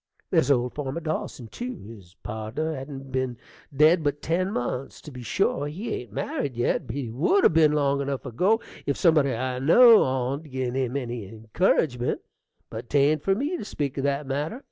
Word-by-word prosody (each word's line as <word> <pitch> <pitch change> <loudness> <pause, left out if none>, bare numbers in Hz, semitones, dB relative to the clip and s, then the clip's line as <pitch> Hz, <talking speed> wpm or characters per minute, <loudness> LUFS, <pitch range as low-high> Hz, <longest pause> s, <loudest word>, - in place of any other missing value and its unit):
There's 130 - +3
old 125 -3 +2
farmer 145 +1 -4
Dawson, 155 -6 -4
tew, 250 - -5
his 100 -4 -13
pardner 110 +9 -3
hain't 135 0 -8
ben 130 -2 -2 0.3
dead 155 +4 +4
but 145 0 0
ten 185 +4 0
months. 125 -3 -3
To 150 - -10
be 125 -2 -9
sure, 145 - 0
he 185 +11 -5
ain't 120 -4 -6
married 130 +4 -3
yet; 120 +1 0
but 115 - -5
he 130 -5 -4
would 170 - +2
'a' - - +8
ben 155 -2 +4
long 140 -1 +1
enough 140 -1 -3
ago, 185 - +2 0.3
if 140 - 0
somebody 155 -6 +4
I 125 +1 -2
know 225 - +7
on 130 +2 -1
'd 155 -3 -15
gin 130 -2 -2
him 130 0 -1
any 120 -6 -5
incurridgement. 120 - 0 0.5
But 115 +2 -7
'tain't 145 +1 +3
for 195 +4 +2
me 290 - -1
to - - -6
speak 145 -9 -3
o' 135 - -2
that 140 +1 -1
matter. 145 - -3
140 Hz, 190 wpm, -25 LUFS, 125-155 Hz, 0.5 s, a